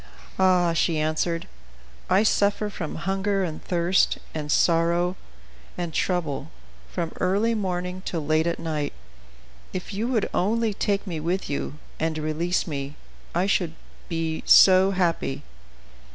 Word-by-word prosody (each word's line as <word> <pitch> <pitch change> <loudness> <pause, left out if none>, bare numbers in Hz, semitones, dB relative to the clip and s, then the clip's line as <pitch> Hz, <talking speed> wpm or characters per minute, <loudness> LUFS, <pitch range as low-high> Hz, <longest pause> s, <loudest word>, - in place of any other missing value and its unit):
"Ah!" 180 -2 +4
she 165 0 +1
answered, 155 +2 -1 0.6
"I 195 - +4
suffer 205 0 +2
from 160 -5 -5
hunger 195 +1 0
and 160 -4 -4
thirst, 175 +1 +2 0.2
and 150 -2 -3
sorrow, 170 +2 +3 0.6
and 175 -2 -3
trouble, 170 -7 -1 0.4
from 165 - -3
early 205 +5 +2
morning 180 -3 -2
till 165 -4 -3
late 155 +2 +2
at 170 - 0
night; 155 -3 -3 0.8
if 185 +3 -5
you 215 +4 -1
would 235 -5 +1
only 220 +3 +1
take 200 0 -1
me 170 -5 -4
with 175 +2 -2
you, 145 +1 -3 0.2
and 160 0 -1
release 155 +4 0
me, 140 -2 -5 0.4
I 175 +2 +2
should 175 -4 0 0.3
be 165 -2 -2
so 190 0 +8
happy." 170 - 0
175 Hz, 135 wpm, -25 LUFS, 160-190 Hz, 0.8 s, so